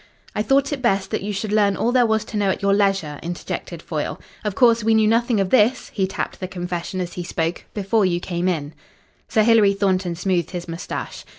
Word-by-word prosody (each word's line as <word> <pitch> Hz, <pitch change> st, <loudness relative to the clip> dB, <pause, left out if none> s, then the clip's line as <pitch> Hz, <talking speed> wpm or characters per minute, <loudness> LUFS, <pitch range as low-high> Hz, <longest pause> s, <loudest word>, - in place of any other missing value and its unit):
"I 210 Hz, -, -1 dB
thought 275 Hz, +6 st, +2 dB
it 275 Hz, -, -4 dB
best 195 Hz, -5 st, +1 dB
that -, -, -1 dB
you 205 Hz, +2 st, -3 dB
should 205 Hz, +1 st, -3 dB
learn 205 Hz, -2 st, +3 dB
all 240 Hz, -, +1 dB
there 245 Hz, -2 st, +4 dB
was 220 Hz, -1 st, +1 dB
to 215 Hz, -, -5 dB
know 200 Hz, -1 st, +2 dB
at 190 Hz, -, -2 dB
your 200 Hz, 0 st, +3 dB
leisure," 195 Hz, -8 st, +1 dB
interjected 175 Hz, +1 st, -5 dB
Foyle. -, -, -3 dB, 0.2 s
"Of 210 Hz, -3 st, -2 dB
course, 235 Hz, -3 st, +4 dB
we 225 Hz, 0 st, +3 dB
knew 220 Hz, -1 st, +4 dB
nothing 230 Hz, 0 st, +2 dB
of 195 Hz, -1 st, 0 dB
this" 250 Hz, +1 st, +3 dB
he 190 Hz, -2 st, 0 dB
tapped 190 Hz, -, -4 dB
the 185 Hz, -, -4 dB
confession 180 Hz, 0 st, -4 dB
as 175 Hz, -1 st, -3 dB
he 180 Hz, -, -4 dB
spoke 165 Hz, 0 st, -2 dB
"before 205 Hz, +1 st, +1 dB
you 175 Hz, -1 st, 0 dB
came 175 Hz, 0 st, -2 dB
in." 155 Hz, -4 st, -2 dB, 0.6 s
Sir 220 Hz, -3 st, +3 dB
Hilary 215 Hz, -3 st, +5 dB
Thornton 185 Hz, -3 st, 0 dB
smoothed 175 Hz, -1 st, 0 dB
his 175 Hz, -2 st, -6 dB
moustache. 165 Hz, +1 st, -6 dB
195 Hz, 220 wpm, -22 LUFS, 180-220 Hz, 0.6 s, Hilary